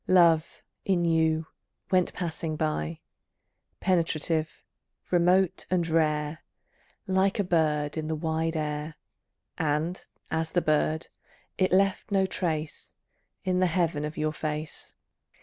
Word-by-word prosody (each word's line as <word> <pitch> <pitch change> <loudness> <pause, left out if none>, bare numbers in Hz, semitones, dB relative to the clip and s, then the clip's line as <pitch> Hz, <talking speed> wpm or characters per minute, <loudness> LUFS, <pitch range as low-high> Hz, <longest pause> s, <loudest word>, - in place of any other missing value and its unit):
Love, 170 -3 +4 0.2
in 180 -3 +2
you, 160 -1 +2 0.5
went 185 -1 +3
passing 165 -2 -3
by, 75 - -2 0.8
Penetrative, 165 -3 0 0.5
remote, 180 +1 +3
and 175 -2 +1
rare, 155 -1 +1 0.6
Like 190 0 +2
a 205 - +2
bird 155 -4 +1
in 155 -1 -2
the 160 - -1
wide 160 +1 -1
air, 150 0 -3 0.6
And, 160 +4 0 0.3
as 160 0 -1
the 175 - +4
bird, 155 +1 +1 0.5
it 185 - +3
left 195 +3 +2
no 195 -1 +3
trace 160 -5 -3 0.5
In 185 -1 +1
the 185 - +4
heaven 165 -3 0
of 150 +1 -5
your 155 0 0
face. 155 0 -5
160 Hz, 120 wpm, -28 LUFS, 155-180 Hz, 0.8 s, Love